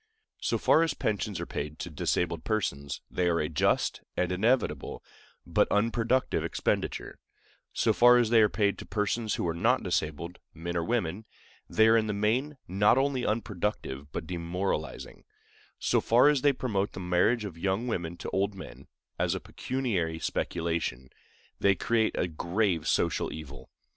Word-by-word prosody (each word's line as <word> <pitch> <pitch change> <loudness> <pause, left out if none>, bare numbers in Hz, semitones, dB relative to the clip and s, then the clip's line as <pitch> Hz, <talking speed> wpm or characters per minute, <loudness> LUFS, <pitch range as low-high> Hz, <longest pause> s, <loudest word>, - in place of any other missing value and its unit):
So - - 0
far 160 - +4
as 165 -3 +1
pensions 105 -2 -2
are - - -3
paid 75 +1 -5
to 90 - -6
disabled 85 +2 -1
persons, 70 - -2
they 90 -1 +1
are 85 -1 +1
a 75 - 0
just 75 -2 +1 0.2
and 90 0 +1
inevitable, 115 +8 0 0.4
but - - +2
unproductive 115 +4 +1
expenditure; - - -2 0.5
so - - +2
far 120 0 +7
as 120 -2 +2
they 115 -1 +6
are 105 - +5
paid 100 -2 0
to - - -8
persons 105 +1 -1
who - - -1
are 85 - 0
not 85 - +2
disabled,—men 85 +2 -4
or 85 - 0
women,—they 110 +2 -1
are 110 - +6
in 110 -1 +1
the 105 - -1
main 125 +8 0
not 105 +6 +3
only 135 -2 +1
unproductive 105 - -3
but 80 - -4
demoralizing; 85 -1 -3 0.5
so - - +1
far 125 +5 +5
as 145 -3 +2
they 145 - +5
promote 105 -7 -2
the - - -7
marriage 95 +6 +2
of 95 -5 -6
young 95 +7 -1
women 85 -6 -3
to - - -6
old 100 +1 0
men, 65 -7 -10 0.3
as - - +1
a - - -3
pecuniary 100 -12 -2
speculation, 80 -7 -2 0.5
they 100 -1 +4
create 110 +4 +1
a - - +1
grave 85 0 -1
social - - +1
evil. 70 -3 -9
100 Hz, 160 wpm, -29 LUFS, 85-115 Hz, 0.5 s, far